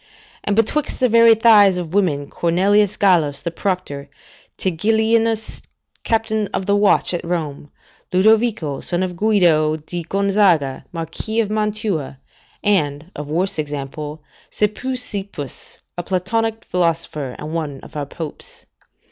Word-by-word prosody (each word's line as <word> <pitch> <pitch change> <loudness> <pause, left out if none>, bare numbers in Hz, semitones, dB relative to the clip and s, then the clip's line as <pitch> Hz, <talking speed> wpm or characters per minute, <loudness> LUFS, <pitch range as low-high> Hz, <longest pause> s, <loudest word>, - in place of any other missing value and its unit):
And 205 - 0
betwixt 225 +7 0
the 255 -2 +3
very 230 0 +7
thighs 210 -4 +6
of 170 -2 -5
women, 155 -8 +1
Cornelius 195 +4 +2
Gallus 165 -8 +3
the 170 - -3
proctor; 170 -7 -3 0.5
Tigillinus, 220 +4 +1 0.4
captain 220 -2 0
of 190 - -2
the 200 - +2
watch 205 -2 +3
at 175 - -2
Rome; 155 -4 -4 0.4
Ludovico, 210 - +2
son 175 +1 0
of 180 -1 -3
Guido 170 -7 +3
di 170 +3 -6
Gonzaga, 190 -6 +1
Marquis 170 +7 -3
of 215 -2 0
Mantua; 210 - -1 0.5
and 160 -5 0
(of 150 0 -6
worse 180 +4 -1
example) 150 +1 -5 0.3
Speusippus, 210 - -3
a 175 - -3
Platonic 220 +5 -1
philosopher, 165 -6 -1
and 155 +1 -7
one 150 -5 -3
of - - -14
our 145 -2 -3
Popes. 160 0 -7
185 Hz, 125 wpm, -20 LUFS, 155-215 Hz, 0.5 s, very